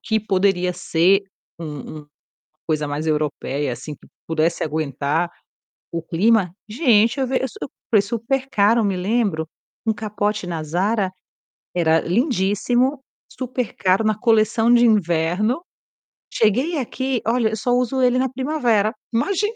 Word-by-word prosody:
que 220 -1 0
poderia 190 -3 +1
ser 180 +2 +2 0.4
um 165 - -6
um 150 0 -7
uma 145 - -19 0.7
coisa 150 -1 -1
mais 145 +2 -3
europeia 150 -3 -1
assim 140 +5 -8
que - - -21 0.2
pudesse 160 +1 0
aguentar 155 +2 -1 0.6
o 170 -1 -3
clima, 185 +3 +2 0.2
gente 235 0 +3
eu 265 - +1
v 260 +1 0
eu 265 +1 -5 0.2
foi 215 -3 +5
supercaro. 230 0 +1
Eu - - +1
me 195 -2 0
lembro, 190 -4 0 0.4
um 220 - +3
capote 210 -1 -2
na 165 -3 -3
Zara, 190 +6 0 0.6
era 165 -2 +3
lindíssimo, 240 - +1 0.3
supercaro 240 -6 -1
na 215 -1 +1
coleção 225 0 +3
de 240 0 +6
inverno. 200 - +1 0.7
Cheguei 255 - +2
aqui, 260 0 -2
olha, 230 -1 +2
eu 220 - -3
só 245 +4 -1
uso 250 +1 +1
ele 250 0 +3
na 260 0 +1
primavera, 245 -5 +1 0.2
imagina. 400 - 0
210 Hz, 140 wpm, -21 LUFS, 170-245 Hz, 0.7 s, de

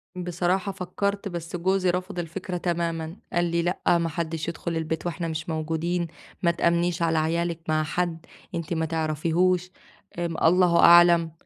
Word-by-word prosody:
بصراحة 180 +2 -1
فكّرت، 200 +2 -3
بس 170 -2 -5
جوزي 185 +1 +1
رفض 180 +1 -2
الفكرة 180 +2 -4
تمامًا، 170 -2 -2 0.2
قال 175 0 +2
لي: 170 0 0
"لأ، 175 0 +1
ما 170 -1 -1
حدّش 160 0 -3
يدخل 170 0 -3
البيت 160 0 -3
وإحنا 175 0 -2
مش 160 +1 -4
موجودين، 165 +2 -1 0.4
ما 170 - +4
تآمنيش 170 0 +1
على 165 -1 +2
عيالِك 165 +1 0
مع 155 0 +2
حد 165 +1 -2 0.3
أنتِ 170 0 -3
ما 160 -1 0
تعرفيهوش، 165 +3 0 0.5
الله 170 +1 +3
أعلم 170 -1 +7
170 Hz, 145 wpm, -25 LUFS, 165-180 Hz, 0.5 s, أعلم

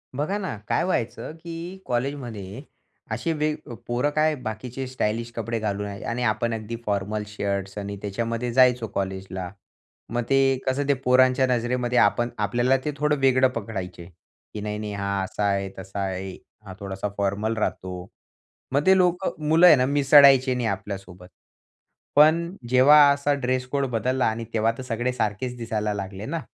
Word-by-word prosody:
बघा 155 +9 -1
ना, 190 - -4
काय - - +1
व्हायचं 155 -7 -2
की 170 +2 -7
कॉलेजमध्ये, 120 -6 -4 0.5
असे 165 - -1
वेग 150 0 0 0.3
पोरं 120 +4 0
काय 155 0 +3
बाकीचे 125 +1 -6
स्टाइलिश 115 -2 -2
कपडे 115 0 -3
घालून 105 -1 -2
याय 100 0 -7
आणि 120 +1 -2
आपण 115 +1 0
अगदी 110 +1 -5
फॉर्मल 105 +1 -1
शर्ट्स 100 -1 -3
आणि 100 0 -4
त्याच्यामध्ये 115 +4 -3
जायचो 125 -2 +4
कॉलेजला. 95 -2 -4 0.6
मग 120 +1 -1
ते 135 -1 +3
कसं 135 +2 0
ते 140 - +4
पोरांच्या 130 0 +3
नजरेमध्ये 125 0 0
आपण 120 0 +3
आपल्याला 120 +6 +2
ते 150 - 0
थोडं 150 0 +1
वेगळं 130 -1 +4
पकडायचे 95 -6 -5 0.5
की, 105 - -5
"नाही-नाही 105 0 -4
हा 100 0 -3
असा 100 +2 -4
आहे, 100 -1 -1
तसा 95 +1 -7
आहे, 95 0 -3 0.3
हा 95 - -8
थोडासा 100 0 -4
फॉर्मल 100 +3 -1
राहतो." 90 -4 -3 0.7
मग 140 +2 +1
ते 190 0 +6
लोकं 180 0 +1
मुलं 165 +3 +6
आहे 165 - +9
ना, 130 -2 +2
मिसळायचे 140 -1 +6
नाही 125 -2 -1
आपल्यासोबत. 95 -2 -6 0.9
पण 165 +4 +4
जेव्हा 130 +4 +7
असा 140 +1 +1
ड्रेस 130 -2 -1
कोड 140 +1 -1
बदलला 125 +3 0
आणि 115 +1 -1
तेव्हा 110 0 +2
तर 130 - -6
सगळे 125 +1 -2
सारखेच 120 +2 -2
दिसायला 105 -3 -2
लागले 95 0 -6
ना. 165 +6 -3
120 Hz, 160 wpm, -24 LUFS, 105-135 Hz, 0.9 s, आहे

